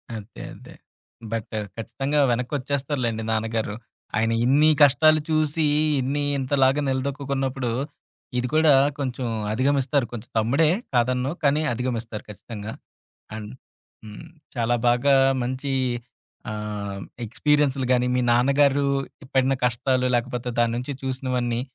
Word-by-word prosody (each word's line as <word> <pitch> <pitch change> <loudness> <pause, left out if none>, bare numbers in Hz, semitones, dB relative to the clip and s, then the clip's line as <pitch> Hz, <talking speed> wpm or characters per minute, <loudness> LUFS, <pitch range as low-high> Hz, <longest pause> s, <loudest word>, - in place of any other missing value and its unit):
అదే, 110 +1 -9
అదే. - - -14 0.6
బట్టు 115 -1 -3 0.2
ఖచ్చితంగా 135 +6 -2
వెనక్కొచ్చేస్తారులెండి 125 -2 -2
నాన్నగారు. 110 -1 -1 0.4
ఆయన 115 +1 +2
ఇన్ని 145 +5 +5
కష్టాలు 155 +2 +6
చూసి, 155 0 +1 0.3
ఇన్ని 140 +3 -1 0.2
ఇంతలాగా 135 +1 +2
నిలదొక్కుకున్నప్పుడు, 135 -1 -2 0.7
ఇది 125 0 0
కూడా 155 -2 +5 0.3
కొంచెం 130 -2 -2 0.2
అధిగమిస్తారు. 135 +2 +1
కొంచెం 120 0 -7
తమ్ముడే 140 +8 +3 0.3
కాదనను 125 +2 +1
కానీ, 145 +2 +3
అధిగమిస్తారు 115 -2 -4
ఖచ్చితంగా. 105 +1 -8 0.6
అండ్ 105 -1 -7 0.5
హ్మ్. 105 +9 -10 0.3
చాలా 120 +1 +2
బాగా 125 +4 +3 0.3
మంచి 130 +3 -3 0.8
ఆహ్, 105 -2 -5 0.2
ఎక్స్‌పీరియన్స్‌లు‌ 140 +2 +1
గానీ, 125 0 +3
మీ 125 - +2
నాన్నగారు 140 +3 +3 0.5
పడిన 135 0 +3
కష్టాలు, 125 +1 +1
లేకపోతే 125 0 -2
దాన్నుంచి 120 +4 -1
చూసినవన్నీ 125 -2 -1
130 Hz, 105 wpm, -24 LUFS, 115-140 Hz, 0.8 s, కష్టాలు